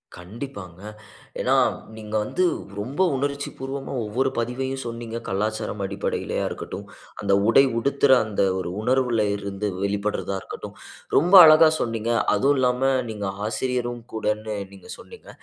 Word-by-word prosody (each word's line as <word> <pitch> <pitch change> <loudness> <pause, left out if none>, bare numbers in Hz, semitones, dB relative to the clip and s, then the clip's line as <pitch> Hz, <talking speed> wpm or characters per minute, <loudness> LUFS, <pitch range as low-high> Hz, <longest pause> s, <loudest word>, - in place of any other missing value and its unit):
கண்டிப்பாங்க. 95 -2 -9 0.6
ஏன்னா, - - +2 0.4
நீங்க 110 -1 -7
வந்து 180 +12 -1 0.4
ரொம்ப 130 - -3
உணர்ச்சி 140 +1 -2
பூர்வமா 135 +1 -5
ஒவ்வொரு 125 +6 0
பதிவையும் 130 +3 -2
சொன்னீங்க. 115 -1 -5
கலாச்சாரம் 105 +1 -2
அடிப்படையிலயா 100 +1 -2
இருக்கட்டும். - - -7 0.4
அந்த 100 -1 +1
உடை 115 +4 +6
உடுத்துற 140 +3 +2
அந்த 105 -2 -2 0.2
ஒரு 90 - -4
உணர்வுல 125 -2 +1
இருந்து 100 +1 -4 0.2
வெளிப்படுறதா 100 0 -2
இருக்கட்டும். - - -9 0.4
ரொம்ப 175 +6 +3
அழகா 155 +1 +8
சொன்னீங்க. 115 -1 -2 0.2
அதுவும் 140 +2 +3
இல்லாம 125 0 +1 0.3
நீங்க 105 -2 -5 0.2
ஆசிரியரும் 120 +1 -2
கூடன்னு 110 -1 -2 0.2
நீங்க 95 -2 -14
சொன்னீங்க. - - -14
115 Hz, 125 wpm, -24 LUFS, 105-130 Hz, 0.6 s, அழகா